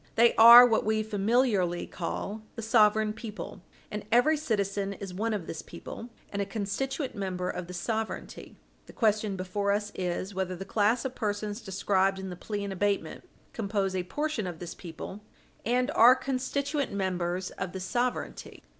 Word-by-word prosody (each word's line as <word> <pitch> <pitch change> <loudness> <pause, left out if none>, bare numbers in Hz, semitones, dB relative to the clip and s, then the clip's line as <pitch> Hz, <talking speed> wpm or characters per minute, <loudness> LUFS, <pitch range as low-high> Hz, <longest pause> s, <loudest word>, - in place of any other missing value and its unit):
They 235 +1 +5
are 235 +2 +11
what 225 -2 +2
we 215 0 +1
familiarly 205 -4 +1
call 200 +4 -4
the 230 - -6
"sovereign 215 -1 +4
people," 215 -3 -8 0.3
and 210 0 -4
every 245 +7 +5
citizen 200 -7 -1
is 195 -2 -8
one 220 +5 -1
of 205 -6 -2
this 160 - -6
people, 235 - -9 0.2
and 200 - -2
a - - 0
constituent 260 +7 -3
member 185 -2 -3
of 175 - -6
this 180 0 -6
sovereignty. 220 +3 -4 0.3
The - - -12
question 215 -3 +1
before 190 +2 -1
us 205 0 -1
is 185 +2 -3
whether 185 -1 -2
the 195 +2 -7
class 220 +5 +1
of 260 - -2
persons 210 -1 -3
described 195 -1 +1
in 190 -1 -6
the - - -6
plea 205 +3 -4
in 200 - -4
abatement 200 +1 -2 0.2
compose 200 -3 -1
a 185 - 0
portion 270 +2 -2
of 175 -2 -5
this 175 0 -7
people, 180 +4 -8 0.4
and 250 +4 +1
are 245 +3 +7
constituent 275 +2 -2
members 185 -2 -2
of 185 -2 -5
this 190 0 -5
sovereignty? 245 +3 -3
205 Hz, 170 wpm, -28 LUFS, 190-230 Hz, 0.4 s, are